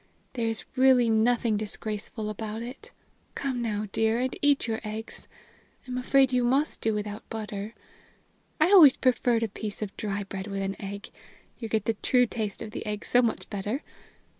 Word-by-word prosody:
There 235 -3 -1
is 225 0 -3
really 255 -3 +5
nothing 225 0 +2
disgraceful 215 +1 -4
about 220 +1 -5
it. 275 - -9 0.4
Come 260 -3 -2
now, 215 -2 -1
dear, 225 +2 +1
and 255 +1 -1
eat 285 -1 +3
your 225 -1 -2
eggs 220 +1 -6 0.6
I'm 250 - -4
afraid 260 +1 +3
you 250 -1 +3
must 270 +5 +1
do 220 -1 +1
without 210 0 -5
butter. 215 0 -5 0.8
I 315 +5 +4
always 320 -10 +9
preferred 245 -2 +2
a - - +1
piece 210 +1 -5
of 205 - -6
dry 205 -1 -2
bread 195 0 -6
with 195 -1 -3
an 195 0 -2
egg 200 +1 -7 0.5
you 225 - -5
get 215 -2 0
the 225 - +2
true 250 -1 +4
taste 220 -3 -4
of 215 - -8
the - - -5
egg 210 0 -3
so 245 - +4
much 230 -2 -1
better. 210 +8 -3
225 Hz, 180 wpm, -27 LUFS, 210-250 Hz, 0.8 s, always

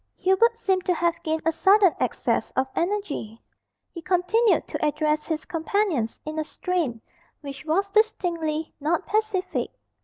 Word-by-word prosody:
Hubert 420 +5 +3
seemed 380 -4 0
to 360 - +2
have 340 0 0
gained 315 0 -2
a 325 - +4
sudden 385 +2 +5
access - - 0
of 260 - +2
energy. 340 - -2 0.5
He 335 - -8
continued 375 +7 +2
to - - -4
address 300 0 0
his 315 -1 -3
companions 325 - -1
in 310 +1 -4
a - - 0
strain 310 -8 -2 0.4
which 280 -1 -8
was 390 +6 0
distinctly 340 -8 0
not 310 +3 0
pacific. 420 -3 -1
340 Hz, 145 wpm, -25 LUFS, 310-390 Hz, 0.5 s, sudden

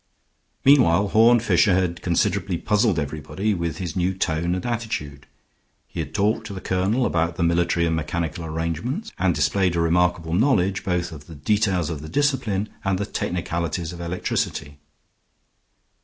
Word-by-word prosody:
Meanwhile 105 -9 +5
Horne 115 +3 +5
Fisher 95 -4 +3
had 90 -2 -1
considerably 95 +1 0
puzzled 105 0 +1
everybody 80 +8 -2
with 85 -4 -3
his 90 -4 -5
new 95 +1 0
tone 85 -1 0
and 90 - -4
attitude. 110 - -4 0.6
He - - -8
had - - -4
talked 110 +2 0
to 100 - -7
the - - -5
colonel 95 +8 0
about 85 -3 0
the 85 - -1
military 85 0 +2
and 80 -1 +1
mechanical 80 +1 -3
arrangements, 85 - -3
and 90 -2 +2
displayed 85 +5 +1
a - - +1
remarkable 85 0 +1
knowledge 95 -3 +2
both 90 -2 -1
of 75 -2 -11
the 80 - -10
details 90 +1 0
of 75 0 -6
discipline 110 - 0
and 95 -1 +1
the 100 - -2
technicalities 85 -3 -3
of 85 - -8
electricity. 75 -4 -3
90 Hz, 155 wpm, -23 LUFS, 85-100 Hz, 0.6 s, Meanwhile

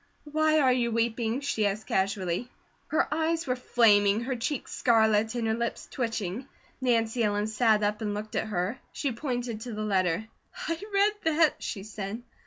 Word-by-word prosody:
"Why 310 +1 +2
are 260 -3 +4
you 240 -2 +1
weeping?" 230 +2 0
she 220 -7 +1
asked 200 +1 -3
casually. 190 +2 -1 0.4
Her 315 - +1
eyes 325 +1 0
were 250 -2 0
flaming, 210 -4 +4
her 255 +2 -2
cheeks 250 +3 -3
scarlet, 220 -1 +3
and 235 -2 -1
her 220 - +1
lips 235 +1 -3
twitching. 230 -1 -3 0.3
Nancy 235 -2 +1
Ellen 205 -1 +1
sat 220 -1 +2
up 210 +1 0
and 205 -1 -2
looked 215 +1 -6
at - - 0
her. 205 +5 -2
She 280 - -2
pointed 245 -3 -3
to 240 0 -6
the 215 0 -3
letter: 190 0 +1 0.4
"I 330 +1 -2
read 400 +1 +3 0.2
that," 320 -2 +3
she 195 -5 -4
said. 215 +2 -6
225 Hz, 175 wpm, -28 LUFS, 210-255 Hz, 0.4 s, are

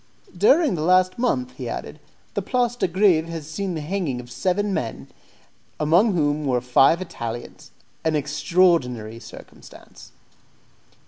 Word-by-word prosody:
"During 275 - +4
the 165 - -3
last 185 +4 +3
month," 255 +1 0
he - - -5
added, - - -6 0.3
"the - - -1
Place 245 -2 0
de 245 - 0
Greve 175 -3 +3
has 165 -3 -6
seen 180 +3 -4
the 155 - -4
hanging 155 -5 -2
of 120 0 -11
seven 195 +8 -1
men, 120 -10 -4 0.7
among 175 +7 +3
whom 150 -2 +1
there 145 - -2
were 125 - +2
five 135 +8 +3
Italians. 120 -8 -7 0.3
An 160 -1 +1
extraordinary 145 -6 +1
circumstance." - - -14
165 Hz, 140 wpm, -23 LUFS, 145-195 Hz, 0.7 s, During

